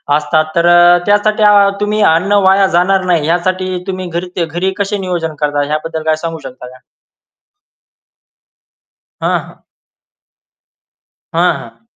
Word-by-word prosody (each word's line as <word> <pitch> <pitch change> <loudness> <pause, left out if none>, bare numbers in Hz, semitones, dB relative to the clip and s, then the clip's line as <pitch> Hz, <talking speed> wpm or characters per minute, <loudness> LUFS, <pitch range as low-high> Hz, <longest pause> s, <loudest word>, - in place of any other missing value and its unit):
असतात 155 +1 +1
तर 170 0 +2
अ, 175 0 +6
त्यासाठी 210 +1 +1
अ, 205 -1 +5
तुम्ही 210 +1 -1
अन्न 185 +5 0
वाया 195 +1 +4
जाणार 190 +2 +2
नाही 160 -4 +1
यासाठी 185 +2 -1
तुम्ही 185 -1 -4
घरी 180 -1 -3
घरी 175 +4 -2
कसे 200 +1 -1
नियोजन 165 -3 -3
करता 145 -1 0
याबद्दल 160 +1 -3
काय 155 0 +1
सांगू 165 -1 -4
शकता 125 0 -11
का? 130 +1 -15 2.4
हां, - - 0
हां. - - -18 1.7
हां, 175 +2 +2
हां. 115 -2 -14
175 Hz, 130 wpm, -14 LUFS, 160-190 Hz, 2.4 s, अ